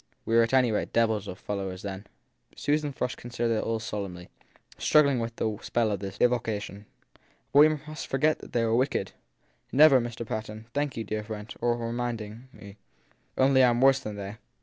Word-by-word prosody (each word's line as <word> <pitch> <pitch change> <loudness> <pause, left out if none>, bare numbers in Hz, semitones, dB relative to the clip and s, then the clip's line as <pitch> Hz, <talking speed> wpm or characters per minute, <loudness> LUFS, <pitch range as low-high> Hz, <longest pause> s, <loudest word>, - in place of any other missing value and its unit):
We 115 - 0
were 115 - +7
at 115 - +1
any 125 -3 +4
rate 105 - -2
devils 110 -3 +1
of 90 - -6
fellows 95 -2 -5
then! 100 0 -6 0.5
Susan 145 0 0
Frush 125 -2 -3
considered 120 -1 -2
it - - -1
all 115 0 -1
solemnly, 100 -5 -6 0.5
struggling 140 -4 +4
with 115 0 -4
the 110 -3 -2
spell 115 -2 0
of 100 - -2
this 100 0 -6
evocation. 110 -4 -1 0.7
But 150 +1 +5
must 155 0 -6
we - - -27
forget 150 +3 +2
that - - -12
they 115 -1 +1
were 110 - +1
wicked? 130 -6 0 0.6
Never! 140 -2 +7
Mr. 120 0 -5
Patten 110 0 -5
laughed. 115 - -30
Thank 145 -3 -1
you, 115 - -2
dear 105 0 -3
friend, 105 0 -7
for 120 0 0
reminding 115 0 -4
me. 100 -3 -13 0.6
Only 130 0 +5
I 125 - +6
m 120 0 +1
worse 135 +1 +5
than 105 -6 -6
they 100 +1 -7
115 Hz, 195 wpm, -27 LUFS, 105-130 Hz, 0.7 s, were